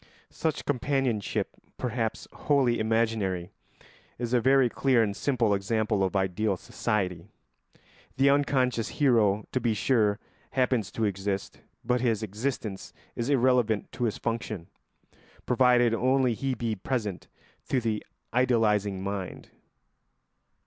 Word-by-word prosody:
Such 160 -2 -2
companionship, 130 -5 0 0.3
perhaps 115 -3 -2
wholly 135 -5 +2
imaginary, 110 -5 0 0.7
is 120 0 -3
a 125 - +4
very 135 +1 +5
clear 125 0 +2
and 100 -2 -2
simple 120 -6 +1
example 105 0 0
of 95 +1 -1
ideal 95 +1 0
society. 90 -5 -2 0.9
The 140 +1 +5
unconscious 130 -5 +1
hero, 110 -8 +3
to 130 - 0
be 115 -2 +1
sure, 105 -2 +2 0.4
happens 125 -5 +1
to 115 - -2
exist, 100 0 -3 0.2
but 125 0 +1
his 115 -3 +1
existence 110 -1 -4 0.2
is 120 +3 -2
irrelevant 125 -5 +2
to 120 - -2
his 110 - -1
function, 115 -6 -4 0.8
provided 125 -2 +4
only 130 +1 +2
he 135 +3 -2
be 115 -1 -2
present 105 -2 -3 0.4
to 130 - +2
the 110 -3 -2 0.3
idealising 105 -6 +2
mind. 100 -1 -5
115 Hz, 120 wpm, -28 LUFS, 105-125 Hz, 0.9 s, very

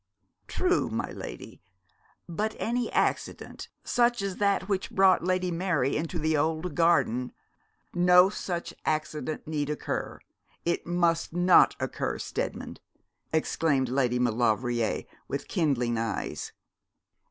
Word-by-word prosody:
'True, - - +1
my - - -3
lady; - - -9 0.7
but 210 +6 -2
any 240 +1 -1
accident, - - -2
such 240 -3 +2
as 195 -2 -3
that 200 -2 +1
which 195 -2 -1
brought 190 -2 +4
Lady 185 0 0
Mary 165 -6 0
into 165 +3 -2
the 155 0 +1
old 160 +3 0
garden 145 -8 +2 0.3
' - - -43
'No 180 +1 +6
such 180 -3 -4
accident 155 -1 -2
need 150 -2 -2
occur 150 - -3 0.5
it 170 0 -1
must 170 -2 +1
not 175 +1 +5
occur, - - -2
Steadman,' - - -4 0.5
exclaimed 150 -4 +1
Lady 125 -2 +1
Maulevrier, 120 0 +1 0.2
with - - -4
kindling 125 -8 0
eyes. 115 -1 -3
165 Hz, 120 wpm, -28 LUFS, 135-185 Hz, 0.7 s, No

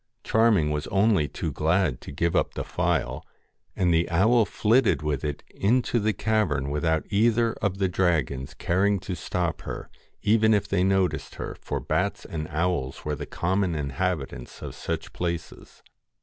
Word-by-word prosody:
Charming 110 -9 +3
was 75 0 -2
only 100 -6 +3
too - - -4
glad 80 -4 +1
to - - -9
give 85 +4 0
up - - +1
the - - -2
phial, - - -1 0.5
and 90 -2 +2
the 80 +1 +2
owl 110 +7 +4
flitted 115 -3 +2
with 75 -4 -1
it 75 -2 -3
into 120 +3 +1
the 110 0 +1
cavern 90 -10 0
without 80 +1 0
either 115 +2 +3
of 100 -2 0
the 95 -1 +2
dragons 80 -8 0
caring 100 +3 +2
to 95 - -4
stop 85 0 -2
her, - - -7 0.3
even 110 +1 +4
if 100 - 0
they 95 -2 +1
noticed 95 -1 +1
her; - - -5
for - - -3
bats - - -1
and 75 -2 -4
owls 80 -5 -1
were 75 - -1
the 75 0 -6
common 95 0 0
inhabitants 70 -2 -3
of - - -6
such - - -4
places. 85 -2 -5
90 Hz, 165 wpm, -26 LUFS, 75-105 Hz, 0.5 s, owl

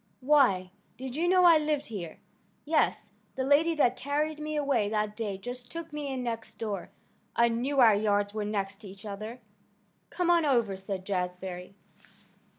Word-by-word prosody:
"Why! 255 -10 +3 0.3
did 260 0 -6
you 335 +3 +1
know 365 0 +5
I 335 -2 +8
lived 300 -1 -1
here?" 180 -8 -6 0.5
"Yes. 305 +1 +1 0.2
The 260 - -1
lady 300 +5 +3
that 250 -5 +3
carried 295 +4 -2
me 305 0 -4
away 275 -8 +1
that 210 -1 -1
day 210 -4 -3
just 245 +4 -7
took 330 -1 -7
me 295 -1 -4
in 260 -1 -3
next 230 -2 -4
door. 210 -3 -4 0.5
I 235 0 +4
knew 255 +5 -1
our 230 -4 +8
yards 205 0 +1
were 215 -1 -2
next 200 -1 -2
to 215 -1 -12
each 195 +2 -12
other." 215 +4 -6 0.7
"Come 355 -1 +1
on 340 -1 +4
over," 235 -9 +2
said 190 0 -5
Jazbury. 180 -1 -4
235 Hz, 170 wpm, -29 LUFS, 205-295 Hz, 0.7 s, I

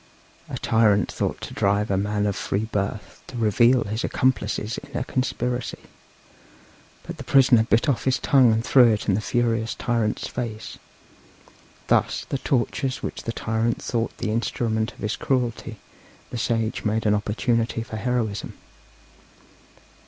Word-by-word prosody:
A - - -4
tyrant 105 -4 +3
thought - - -2
to - - -7
drive 100 +1 +1
a - - +2
man 105 +1 0
of 100 -2 0
free 100 +3 -2
birth 105 -1 -4
to 125 - -8
reveal 120 +3 +4
his 110 +3 -3
accomplices 110 -3 0
in - - -8
a 125 - -1
conspiracy, 125 -1 -2 1.3
but - - -7
the - - -7
prisoner 130 -4 +5
bit 115 0 +2
off 140 -5 0
his 130 -1 +2
tongue 130 -4 +4
and 110 +2 0
threw 125 -4 +6
it 105 - 0
into 100 - +3
the 100 - +1
furious 115 -1 0
tyrant's 115 -3 -1
face; 115 -3 -6 1.1
thus, - - +1
the 140 - -2
tortures 130 0 -1
which - - -4
the 115 - -1
tyrant 115 +1 -1
thought 115 -1 -2
the 110 - -2
instrument 110 0 -1
of - - -23
his 105 0 -2
cruelty 120 -3 -2 0.5
the 120 - -4
sage 115 -2 -1
made 110 +1 0
an 105 - +4
opportunity 115 +2 0
for 110 -1 -7
heroism. 110 -3 -2
115 Hz, 150 wpm, -24 LUFS, 105-120 Hz, 1.3 s, threw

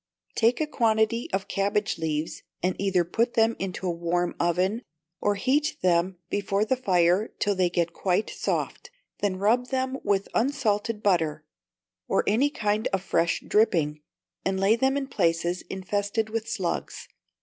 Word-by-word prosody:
Take 235 +2 +2
a 310 - +1
quantity 230 -4 +1
of 190 0 -1
cabbage 200 0 0
leaves, 155 -1 -2 0.2
and 185 0 +1
either 190 -3 +2
put 230 +7 0
them 225 0 +3
into 190 0 -4
a 180 - +1
warm 170 +1 -1
oven, 180 +6 +1 0.4
or 205 0 +1
heat 280 +9 +1
them 180 +1 +2
before 200 +1 0
the 260 - +1
fire 185 -3 +2
till 205 - +1
they 185 -2 +2
get 170 -1 -1
quite 185 +4 0
soft; - - -3 0.3
then 195 -2 0
rub 230 +6 +2
them 260 0 -2
with 200 -1 +1
unsalted 230 -4 0
butter, 160 -6 +1 0.6
or - - +2
any 245 +8 +3
kind 215 -5 0
of 195 -1 -1
fresh 170 -2 +1
dripping, 160 -8 +2 0.4
and 190 0 0
lay 195 +3 +4
them 265 +3 +1
in 280 - -1
places 170 -7 0
infested 205 +3 -2
with 225 0 -3
slugs. 185 -6 -3
200 Hz, 155 wpm, -26 LUFS, 180-225 Hz, 0.6 s, lay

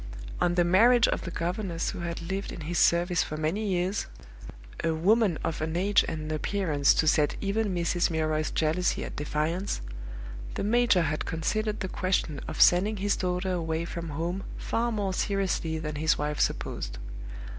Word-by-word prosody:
On 175 0 +2
the 175 - +4
marriage 230 +7 +5
of - - -1
the - - -5
governess 175 0 -2
who - - -7
had 170 -1 -4
lived 195 +3 -3
in - - -7
his 170 +3 -1
service 175 0 +3
for 155 - -3
many 170 +8 -1
years 185 +1 0 0.8
(a 165 -1 +1
woman 195 +1 +3
of 160 - -2
an 160 +1 -2
age 200 +3 +4
and 160 - -3
an 155 0 -5
appearance 155 -5 +2
to 160 - +2
set 150 -1 +3
even 205 +1 0
Mrs. 175 +1 +1
Milroy's 155 -1 0
jealousy 160 +3 0
at - - -7
defiance), 155 +6 -1 0.8
the - - -2
major 225 -4 +3
had 155 -1 -1
considered 210 +6 -1
the 190 - -1
question 185 -6 -1
of - - -6
sending 200 +5 +5
his 200 +1 +1
daughter 180 0 -1
away 165 -2 -1
from 170 -1 -5
home 170 +6 -3
far 235 +1 -1
more 200 -4 -1
seriously 185 -5 -1
than 150 -1 -4
his 160 +2 +2
wife 150 0 -2
supposed. - - -2
175 Hz, 175 wpm, -28 LUFS, 160-195 Hz, 0.8 s, marriage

